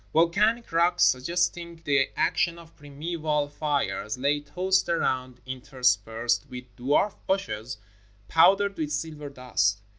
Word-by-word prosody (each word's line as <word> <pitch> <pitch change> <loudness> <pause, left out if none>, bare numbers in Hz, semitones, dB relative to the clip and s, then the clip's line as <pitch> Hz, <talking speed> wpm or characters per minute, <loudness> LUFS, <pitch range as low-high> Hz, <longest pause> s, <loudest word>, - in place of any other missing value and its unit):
Volcanic 210 +9 +2
rocks, 170 +2 +3
sug 130 0 +3
gesting 170 -1 -1
the 140 -3 +2
action 170 0 +1
of 165 -1 -15
primeval 150 0 -3
fires, 145 -6 -2
lay 140 +3 +1
tossed 180 +6 0
around, 130 -6 -1
interspersed 120 -3 0
with 125 0 -10
dwarf 145 +11 +1
bushes 130 - -2 0.5
powdered 195 +4 +4
with 150 -2 -2
silver 150 -1 -4
dust. 125 -7 0
150 Hz, 120 wpm, -26 LUFS, 130-170 Hz, 0.5 s, powdered